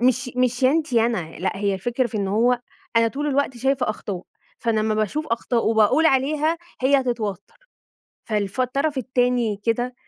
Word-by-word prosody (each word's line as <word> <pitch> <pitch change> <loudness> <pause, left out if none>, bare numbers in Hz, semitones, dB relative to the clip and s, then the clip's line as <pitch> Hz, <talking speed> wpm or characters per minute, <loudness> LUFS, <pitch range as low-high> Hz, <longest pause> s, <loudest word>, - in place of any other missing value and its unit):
مش 250 0 +2
مش 250 0 +1
يا 255 - +6
أنتِ 310 -3 0
يا 230 -1 +4
أنا، 180 -9 -2
لأ 190 +3 -2
هي 200 0 0
الفكرة 240 +6 -1
في 220 - -6
إن 200 -2 -1
هو 240 +4 +2 0.4
أنا 230 0 +5
طول 290 +5 -4
الوقت 280 -3 0
شايفة 265 -2 +1
أخطاء، 195 -4 -5 0.4
فأنا 230 -2 0
امّا 215 0 0
باشوف 215 +9 -1
أخطاء 230 0 0
وباقول 220 +8 +4
عليها 300 +4 +2 0.3
هي 275 +1 +4
هتتوتر، 230 - -4 0.6
فالف 210 +1 -2
الطرف 275 +3 0
التاني 245 -3 +1
كده 240 +2 0
240 Hz, 175 wpm, -23 LUFS, 215-265 Hz, 0.6 s, يا